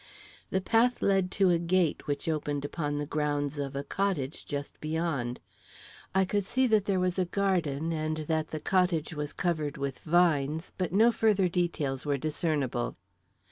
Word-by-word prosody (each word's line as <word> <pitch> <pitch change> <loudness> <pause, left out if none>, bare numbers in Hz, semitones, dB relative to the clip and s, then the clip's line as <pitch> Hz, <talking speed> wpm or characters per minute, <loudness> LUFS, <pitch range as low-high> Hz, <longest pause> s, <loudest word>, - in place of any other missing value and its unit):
The 190 - 0
path 235 +5 +2
led 195 -2 +3
to 190 -2 +5
a 170 - +3
gate 170 -1 +1
which 145 +1 -2
opened 145 -2 -1
upon 145 -1 -2
the 145 - -2
grounds 145 -1 -1
of 140 -1 -3
a 140 - -2
cottage 160 -5 -2
just 145 -1 -5
beyond. 155 -6 -2 0.8
I 190 0 +4
could 205 +2 0
see 260 +7 +1
that 215 -5 +3
there 195 -2 +1
was 180 0 0
a 185 - +2
garden 170 -5 0
and 155 0 -2
that 155 0 0
the 155 - -5
cottage 180 -3 +1
was 150 -1 -4
covered 155 -4 -1
with 140 -1 -3
vines, 160 -2 +2
but 180 - -1
no 220 +5 +5
further 210 -5 +3
details 170 -7 -1
were 145 -2 0
discernible. 145 - -1
160 Hz, 170 wpm, -29 LUFS, 145-185 Hz, 0.8 s, to